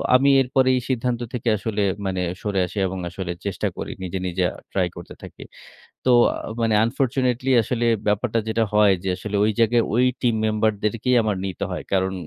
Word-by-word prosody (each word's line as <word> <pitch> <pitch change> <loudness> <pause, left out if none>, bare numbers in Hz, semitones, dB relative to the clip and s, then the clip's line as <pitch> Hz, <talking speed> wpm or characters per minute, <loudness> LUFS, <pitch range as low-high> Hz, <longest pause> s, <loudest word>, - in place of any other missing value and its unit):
আমি 135 +2 +5
এরপরে 130 0 +2
এই 125 - -1
সিদ্ধান্ত 125 -1 -1
থেকে 120 -1 -1
আসলে 105 0 -2 0.2
মানে 95 -1 -1 0.2
সরে 100 -2 -1
আসি 90 - -10
এবং 95 0 -5
আসলে 90 0 -5
চেষ্টা 100 - -2
করি। - - -5
নিজে, 95 +1 -4
নিজে 90 +1 -1
আ - - -12 0.2
ট্রাই 95 -2 +1
করতে 85 - -10
থাকি। - - -10 0.6
তো 130 - +3 0.2
আ - - -5 0.3
মানে 115 -1 +2
unfortunately 130 +1 0
আসলে 120 +2 -1 0.2
ব্যাপারটা 105 +3 +1
যেটা 115 +1 +1
হয় 105 -2 +5
যে - - -1
আসলে 105 +1 -4
ঐ - - +3
জায়গায় 115 +1 +3
ওই 125 +2 +4 0.2
টিম 120 -3 +2
মেম্বার 110 0 +1
দেরকেই 115 +4 +1
আমার 105 -3 -1
নিতে 95 -2 -3
হয়। - - -5
কারণ 95 0 +1
110 Hz, 190 wpm, -22 LUFS, 95-125 Hz, 0.6 s, আমি